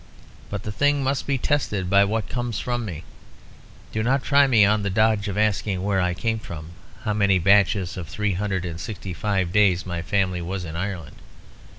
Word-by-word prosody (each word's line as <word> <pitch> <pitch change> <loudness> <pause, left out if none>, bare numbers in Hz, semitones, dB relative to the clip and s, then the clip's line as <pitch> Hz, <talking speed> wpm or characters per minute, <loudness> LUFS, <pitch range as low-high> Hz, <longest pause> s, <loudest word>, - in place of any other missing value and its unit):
But 100 -2 -5
the 105 - -4
thing 145 +4 +1
must 135 0 -1
be 140 -1 +1
tested 120 -9 -1
by 100 +2 +5
what 110 +1 -2
comes 120 -2 -3
from 120 -1 -2
me; 85 -5 -6 0.9
do 110 - -1
not 130 +4 +1
try 140 +2 +5
on - - -1
me 110 -5 +6
the 105 -1 +1
dodge 110 +1 +2
of 100 0 -3
asking 105 -3 0
where 100 -1 +1
I 90 0 0
came 110 +5 -1
from, 80 -5 -8 0.3
how 105 -3 0
many 100 -2 +3
batches 95 0 +3
of 85 -3 -5
three 105 +5 -1
hundred 95 -1 -2
and 85 -1 -5
sixty 95 -1 -6
five 95 0 -1
days 95 -3 +3
my 85 -2 -3
family 90 -1 0
was 90 +1 -4
in 80 -1 -7
Ireland. 90 -6 -5
100 Hz, 200 wpm, -23 LUFS, 90-110 Hz, 0.9 s, me